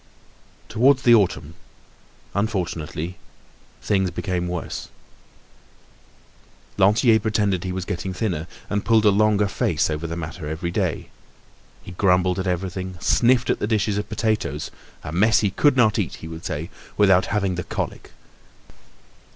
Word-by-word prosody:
Towards 130 +4 +3
the 120 - +6
autumn, 90 -8 +2 0.8
unfortunately, 90 -5 -3 0.7
things 95 -2 +1
became 90 0 -3
worse. 90 -1 -5 1.9
Lantier 110 +4 +4
pretended 105 -4 0
he 90 - -3
was 90 0 -4
getting 95 +2 -4
thinner, 90 -5 -2 0.2
and 105 0 -2
pulled 110 -2 +3
a 105 - +6
longer 105 0 +3
face 95 - 0
over 75 +2 -3
the 85 - -4
matter 80 -1 -6
every 80 +3 -3
day. - - -2 0.7
He - - -9
grumbled 90 0 +2
at 95 - -2
everything, 95 0 -3
sniffed 120 +5 +3
at - - -1
the - - -1
dishes 105 -2 0
of 105 - -6
potatoes—a 80 - -4
mess 110 +7 +3
he 100 -2 +1
could 145 +6 +3
not 110 -2 +4
eat, 95 - -2
he 80 - -10
would 80 0 -9
say, - - -4 0.3
without 95 -3 +4
having 100 -3 0
the 90 0 -3
colic. - - -5
95 Hz, 140 wpm, -23 LUFS, 90-105 Hz, 1.9 s, the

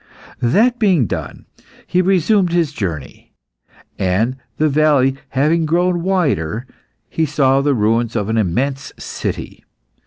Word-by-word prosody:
That 215 - +2
being 185 - +3
done, - - -6 0.4
he 180 - +1
resumed 185 0 +2
his 170 -4 +1
journey, 85 - -6 0.7
and 100 +7 +1 0.2
the 155 - +2
valley 145 -3 +3
having 155 +5 +1
grown 175 +2 +1
wider, 140 - 0 0.4
he 160 -1 -1
saw 135 -1 +2
the 140 -1 +1
ruins 115 +1 +1
of 105 -3 -1
an 110 +1 0
immense 130 +8 -1
city. - - -5
140 Hz, 125 wpm, -18 LUFS, 115-170 Hz, 0.7 s, being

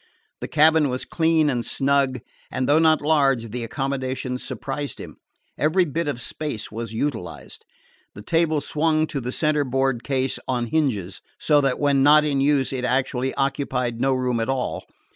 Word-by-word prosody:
The - - -5
cabin 155 -1 +4
was 125 0 -3
clean 160 -2 +2
and 125 -4 0
snug, 135 -2 0 0.3
and, 130 - -2
though 150 +2 +4
not 160 -2 +3
large, 135 -7 +2
the 120 +1 -4
accommodations 130 0 -3
surprised 140 +1 -4
him. - - -10 0.4
Every 175 +5 +3
bit 165 +2 -3
of 125 -4 -3
space 145 -9 -4
was 115 0 -5
utilized. 115 -4 -5 0.5
The 105 - -10
table 160 +1 +1
swung 155 +2 +1
to 140 -3 -4
the 125 +1 -4
centerboard 135 -4 0
case 135 -2 -1
on 125 -2 -1
hinges, 115 - -1 0.2
so 150 -2 +3
that 135 -2 0
when 140 -2 +2
not 150 +2 +6
in 140 -2 0
use 140 -1 +2
it 130 -1 -3
actually 130 0 0
occupied 130 -4 -1
no 135 0 +2
room 125 -2 0
at 115 - -2
all. 135 -1 -2
135 Hz, 165 wpm, -23 LUFS, 125-150 Hz, 0.5 s, not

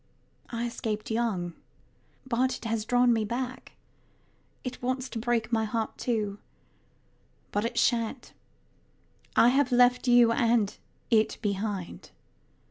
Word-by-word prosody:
I 235 0 -3
escaped 220 -2 -4
young; 210 -7 -1 0.7
but 255 +1 0
it - - -13
has 225 -1 -1
drawn 245 +1 +4
me 225 -1 +1
back. 245 +4 -4 0.9
It 255 -1 -6
wants 255 +1 -1
to 230 - -5
break 235 -1 0
my 225 -1 +2
heart 220 +1 -2
too. 210 -4 -1 1.1
But 205 +2 0
it 230 - -3
shan't. 235 +1 0 1.0
I 235 - +6
have 270 0 +2
left 245 +1 +4
you 240 -1 +6
and 230 -3 +2 0.4
it 220 -1 +3
behind. 200 -2 -3
230 Hz, 125 wpm, -28 LUFS, 220-245 Hz, 1.1 s, I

